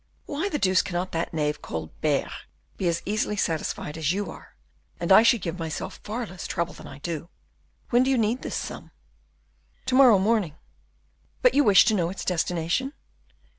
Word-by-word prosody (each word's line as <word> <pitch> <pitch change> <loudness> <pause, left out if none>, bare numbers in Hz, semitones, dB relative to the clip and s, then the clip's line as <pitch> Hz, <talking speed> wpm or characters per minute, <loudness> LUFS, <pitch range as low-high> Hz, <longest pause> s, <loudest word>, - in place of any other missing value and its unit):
Why 315 +8 -2
the 300 - -1
deuce 185 -6 +3
cannot 180 +1 -3
that 165 +1 -2
knave 150 -2 -1
Colbert 80 - -2 0.4
be 185 - -1
as 170 0 0
easily 210 0 -1
satisfied 160 -3 -2
as 155 0 +1
you 195 -2 -2
are - - -14 0.4
and 170 +1 -1
I 190 - +9
should 230 -3 +3
give 170 +1 -4
myself 160 -1 -5
far 230 +3 -3
less 185 -4 -8
trouble 170 0 -2
than - - -11
I 135 - -10
do. 165 +2 -5 0.6
When 240 0 +5
do 260 - +2
you 265 - +3
need 230 +3 +1
this - - -4
sum?" - - -6 1.0
"To 260 - -2
morrow 255 -5 +7
morning; 195 -5 +1 0.9
but - - +6
you 290 - +4
wish 205 -6 +7
to 230 - +3
know 175 -5 +1
its 190 - -6
destination?" 180 - -1
185 Hz, 180 wpm, -26 LUFS, 165-230 Hz, 1.0 s, I